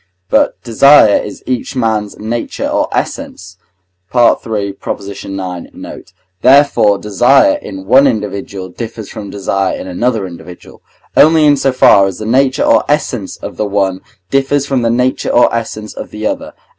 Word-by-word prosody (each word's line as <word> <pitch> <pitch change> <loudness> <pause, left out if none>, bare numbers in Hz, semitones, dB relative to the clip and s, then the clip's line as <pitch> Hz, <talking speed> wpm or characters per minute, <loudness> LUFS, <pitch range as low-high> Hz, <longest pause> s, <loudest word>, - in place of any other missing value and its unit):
But - - +2
desire 120 -1 +5
is 105 - -9
each 130 +1 -3
man's 110 -4 -1
nature 115 +2 -4
or - - 0
essence 95 0 -5 0.6
(III. 110 -4 +1
ix. 100 0 -6
note); 95 -3 -8 0.3
therefore 130 -6 +4
desire 125 - +3
in 95 -1 -9
one 130 +7 +5
individual 100 -5 -4
differs 110 +1 -8
from 100 - -8
desire 95 -1 -2
in - - -7
another 105 +3 -1
individual, 90 0 -12 0.3
only 155 0 +5
in 145 -1 +5
so 135 -1 0
far 100 -6 +5
as 95 - -5
the 110 - -6
nature 130 +4 +2
or - - +3
essence 130 -8 -2
of - - -9
the 105 - -1
one 95 -2 -1 0.3
differs 135 +1 +1
from 135 -3 -1
the 115 - +1
nature 125 +2 0
or 120 - +3
essence 110 -2 -4
of - - -8
the 105 0 -7
other. - - -4
110 Hz, 155 wpm, -13 LUFS, 100-130 Hz, 0.6 s, desire